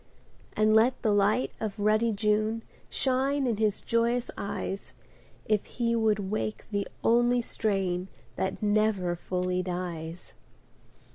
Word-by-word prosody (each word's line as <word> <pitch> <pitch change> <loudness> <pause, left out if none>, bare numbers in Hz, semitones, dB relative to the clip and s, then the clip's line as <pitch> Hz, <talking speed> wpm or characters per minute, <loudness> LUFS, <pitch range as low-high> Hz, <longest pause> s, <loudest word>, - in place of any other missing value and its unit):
And 215 0 +3
let 230 +4 +4
the 220 - +3
light 205 +5 +2
of 220 -1 -3
ruddy 215 +2 +3
June 215 +2 +1 0.3
Shine 270 +1 +1
in 235 -4 0
his 215 -2 +1
joyous 235 +1 +1
eyes. 200 0 -4 0.5
If 215 -2 +1
he 235 -1 -1
would 210 -3 +1
wake 215 0 -2
the 200 -1 -1 0.2
only 240 +1 +3
strain 190 -5 -1 0.3
That 190 +2 -2
never 205 -4 +2
fully 180 +1 -1
dies 175 -2 -5
215 Hz, 125 wpm, -28 LUFS, 195-230 Hz, 0.5 s, let